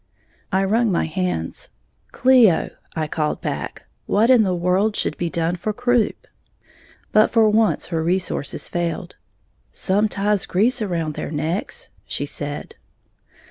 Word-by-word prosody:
I 190 +1 +2
wrung 220 +3 +2
my 175 - +1
hands. 160 - -3 0.4
"Cleo," 250 -9 +4 0.2
I 160 -1 -1
called 150 0 -2
back, - - -5 0.2
"what 225 +5 +3
in 250 -3 +7
the 185 -4 +1
world 185 +5 +1
should - - -1
be 175 - -2
done 170 +1 -1
for 210 +5 -3
croup?" 245 -1 0 0.9
But 215 0 +5
for 225 -2 +4
once 220 0 +2
her 165 -2 -1
resources 180 -3 -1
failed. 175 0 -3 0.6
"Some 205 +3 +1
ties 205 0 0
grease 230 +7 +2
around 170 -6 -2
their - - -5
necks," 165 - -3 0.2
she - - -2
said. - - -5
190 Hz, 140 wpm, -21 LUFS, 170-220 Hz, 0.9 s, in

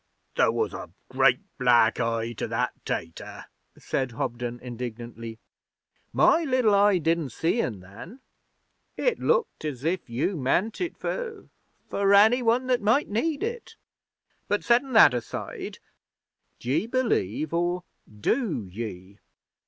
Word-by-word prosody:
'There - - +4
was - - -1
a - - -7 0.2
great - - +3 0.2
black 120 -2 +4
eye 115 -1 -1
to - - -4
that 120 +2 -1
tater,' 80 0 -5 0.3
said 130 -3 -2
Hobden 120 +1 -4
indignantly. 120 -2 -7 0.7
'My 335 - +4
liddle 255 -7 +2
eye 200 -1 +5
didn't 165 -2 0
see 165 - 0
un, 105 -6 -4
then. 110 - -12 0.8
It - - +1
looked 485 - 0
as 140 -4 -4
if 170 -3 -1
you 130 +11 -1
meant 180 - 0
it 345 - -3
for 460 -5 -5 0.4
for 200 0 +3
Any 220 +5 +6
One 240 +2 +2
that 250 -2 +1
might 220 +8 +2
need 285 - -1
it. 465 +1 -5 0.7
But 205 - 0
settin' 245 +3 +2
that 210 - +8
aside, 120 -2 -5 0.8
d'ye 135 - -1
believe 160 - 0
or 175 +1 0 0.3
do 135 - -1
ye?' 95 0 -8
165 Hz, 130 wpm, -26 LUFS, -, 0.8 s, that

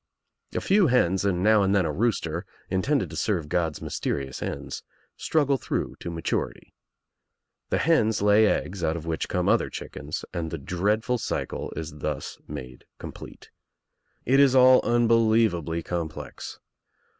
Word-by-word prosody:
A - - 0
few 195 -2 +4
hens 95 -8 +2
and 90 -2 +1
now 110 0 +5
and 100 0 +2
then 95 -3 +3
a 80 - -1
rooster, 85 -3 -1 0.3
intended 130 +9 0
to - - -7
serve 90 -9 -1
God's 80 -1 -1
mysterious 65 -2 -3
ends, - - -5 0.3
struggle 145 -3 +1
through - - -3
to - - -6
maturity. 85 -1 -3 1.0
The - - +1
hens 115 -10 +2
lay 105 +1 +5
eggs 95 -2 -1
(put 80 0 0
of'which 80 0 -3
come - - 0
other - - +3
chickens 75 +3 -6
and 85 -3 -3
the 80 - -4
dreadful 105 - 0
cycTeis 80 -6 -4
thus - - -4
made 65 -1 -8
complete. - - -10 0.7
It 135 +3 +4
is 135 -2 +5
all 130 0 +7
unbelievably 110 -8 +2
complex. 85 -3 -5
95 Hz, 140 wpm, -26 LUFS, 80-115 Hz, 1.0 s, all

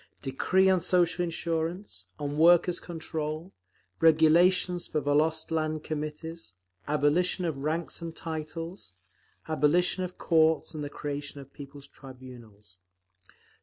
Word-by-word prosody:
Decree 180 +8 +2
on 190 -1 +4
Social 180 0 +2
Insurance, 170 +3 -3
on 145 -1 -3
Workers' 175 +2 +5
Control, 160 0 -5 0.5
Regulations 170 +3 +4
for 155 - -1
Volost 155 +3 +1
Land 155 -1 -1
Committees, 155 - -6 0.3
Abolition 150 +5 +1
of 160 -4 -2
Ranks 155 +5 -3
and 165 -1 -6
Titles, 165 - -6 0.5
Abolition 165 +4 +2
of 180 0 -6
Courts 160 -1 +2
and 150 -1 -5
the 145 - -4
Creation 145 0 -5
of 135 0 -13
People's 140 -1 -10
Tribunals…. 125 -8 -14
160 Hz, 115 wpm, -28 LUFS, 145-170 Hz, 0.5 s, Workers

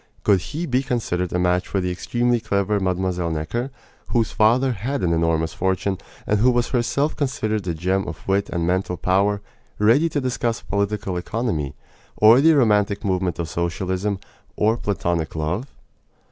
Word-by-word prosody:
Could 100 -3 +4
he 155 - -4
be 130 -3 +1
considered 110 -9 -2
a - - 0
match 90 0 +1
for 100 - -1
the 90 -1 -1
extremely 120 +6 0
clever 100 -1 0
Mlle. 90 -2 -1
Necker, 80 - -2 0.4
whose 115 -4 +1
father 120 +5 +3
had 125 +6 -3
an 85 -2 +2
enormous 80 -1 +1
fortune, 95 0 -1 0.3
and 105 - +1
who 125 +4 +5
was 120 -1 +1
herself 135 +4 0
considered 110 -8 -2
a 85 - -1
gem 95 +4 0
of 75 - -8
wit 100 +1 +1
and 85 -2 -1
mental 90 0 0
power, 100 +3 +1 0.4
ready 120 +11 +4
to 150 - -1
discuss 120 -3 -2
political 100 -1 -1
economy, 90 - -2 0.4
or 115 +4 +7
the 160 +2 +6
romantic 105 -6 +2
movement 95 -2 0
of 85 - -3
socialism, 95 +4 -2 0.4
or 110 +2 +2
platonic 85 -8 -2
love? 85 - -2
100 Hz, 160 wpm, -22 LUFS, 90-120 Hz, 0.4 s, or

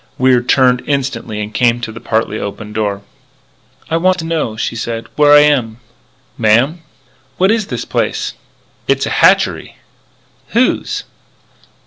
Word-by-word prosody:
Wier 130 -1 +3
turned 125 0 +3
instantly 130 -6 -2
and 105 +1 -6
came 120 0 +2
to 115 - -5
the 115 - -9
partly 110 -1 -1
open 105 +1 -6
door. 100 -2 -2 0.8
"I 165 - 0
want 185 +2 +2
to 165 - -5
know," 155 -10 -2
she 115 - -3
said, 115 0 -4
"where 145 -1 +4
I 145 0 +8
am." 130 -7 +1 0.6
"Ma'am?" 120 +9 +2 0.6
"What 190 +3 +3
is 220 -3 0
this - - -4
place?" - - -2 0.5
"It's - - +1
a - - -4
hatchery - - +2 0.4
" - - -37
"Whose?" 255 - +1
125 Hz, 145 wpm, -15 LUFS, 110-150 Hz, 0.8 s, I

